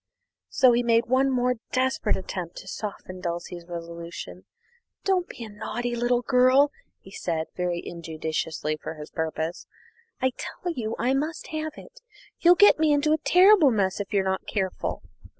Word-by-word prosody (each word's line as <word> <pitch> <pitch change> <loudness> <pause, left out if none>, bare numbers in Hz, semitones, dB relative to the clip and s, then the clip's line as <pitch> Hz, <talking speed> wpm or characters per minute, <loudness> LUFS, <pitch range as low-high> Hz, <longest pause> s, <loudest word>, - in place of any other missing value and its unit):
So 255 -2 +5
he 240 0 +3
made 230 -1 +3
one 260 +2 +3
more 250 -1 +1
desperate 260 +1 +1
attempt 180 -2 -5
to - - -9
soften 185 -2 -6
Dulcie's 170 0 -5
resolution: 170 0 -8 0.6
"Don't 370 -2 +1
be 235 - -8
a 220 - -8
naughty 240 +3 -4
little 240 +1 +1
girl," 255 +3 +4 0.3
he 190 - -15
said, 165 -4 -3
very 180 -1 -1
injudiciously 160 -2 -3
for 160 - -6
his 150 0 -10
purpose, 160 +1 -3 0.5
"I 260 0 +2
tell 350 -1 -5
you 225 -6 -3
I 245 +3 +1
must 305 +4 -2
have 310 -1 -3
it. - - -14 0.4
You'll 350 +1 +6
get 410 -3 +6
me 315 -1 +3
into 295 +1 +3
a 315 - +1
terrible 365 -1 +6
mess 200 -5 0
if 205 - -5
you're 200 -2 +2
not 190 0 -2
careful!" 190 -3 -2
230 Hz, 165 wpm, -26 LUFS, 175-270 Hz, 0.6 s, You'll